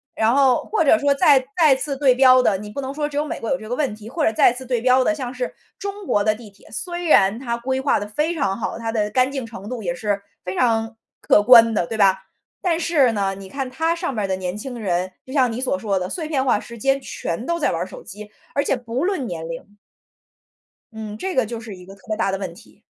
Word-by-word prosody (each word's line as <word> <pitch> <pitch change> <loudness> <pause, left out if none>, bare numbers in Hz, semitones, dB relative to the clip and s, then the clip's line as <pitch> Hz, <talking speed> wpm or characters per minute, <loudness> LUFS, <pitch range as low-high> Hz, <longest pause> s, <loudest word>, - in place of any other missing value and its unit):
然 220 +1 +2
后 265 -2 +4
或 430 -6 +1
者 310 - +6
说 285 -1 +2
再 275 -1 +4
再 305 -5 +6
次 275 +1 -4
对 265 -3 +4
标 255 0 +6
的， 205 -5 +2
你 210 +1 -8
不 210 - -6
能 270 0 -4
说 295 0 -2
只 290 - -6
有 295 - +1
美 - - -5
国 230 - -3
有 270 - +1
这 215 - -10
个 245 - -2
问 275 -5 -1
题， 215 +1 -11
或 315 +5 -2
者 - - +3
再 225 - +4
次 260 +1 -8
对 245 -1 0
标 255 +1 +4
的， 315 - +2
像 260 -5 -5
是 250 -1 -4 0.2
中 400 0 -6
国 205 - +1
的 215 +1 +3
地 220 -1 -12
铁， 200 0 -22
虽 350 -1 -5
然 200 - +4
它 235 -2 -3
规 260 +2 -2
划 275 - +2
得 205 - -5
非 300 +10 -1
常 195 - -1
好， - - -3
它 225 -1 -3
的 210 -2 0
干 255 +3 +2
净 270 -3 -4
程 210 -3 -10
度 245 -3 -5
也 175 -2 -1
是 200 +2 -2 0.2
非 185 +1 -4
常 225 -2 +1 0.3
可 - - +4
观 230 -1 +8
的， 190 - +1
对 225 - -4
吧？ 190 -2 +3 0.4
但 345 -3 +1
是 305 -8 +2
呢， 195 -2 0
你 195 0 -10
看 270 +4 -4
它 325 +5 0
上 335 - -3
面 210 -4 -1
的 190 - 0
年 185 +1 -4
轻 245 +3 -6
人， 185 -4 -1 0.2
就 260 - -11
像 260 -3 +3
你 230 +2 -4
所 250 -8 -1
说 200 -2 -1
的， 180 0 -3
碎 320 - -4
片 285 -4 0
化 250 -6 +2
时 235 +2 -10
间 270 +4 +1
全 220 -5 -5
都 340 +3 -1
在 300 - +1
玩 - - -2
儿 - - -3
手 - - -11
机， 210 0 -10 0.2
而 280 - +2
且 285 - +1
不 245 +4 -3
论 375 -9 -1
年 165 -6 -5
龄。 165 +5 -9 1.2
嗯， 215 -1 -7
这 375 +9 -4
个 255 - +3
就 230 +1 -6
是 220 -3 -9
一 180 -1 -13
个 195 - -12
特 220 +5 -23
别 215 - -1
大 195 - +1
的 195 - -1
问 190 -3 -5
题。 205 - -19
240 Hz, 290 characters per minute, -21 LUFS, 210-275 Hz, 1.2 s, 观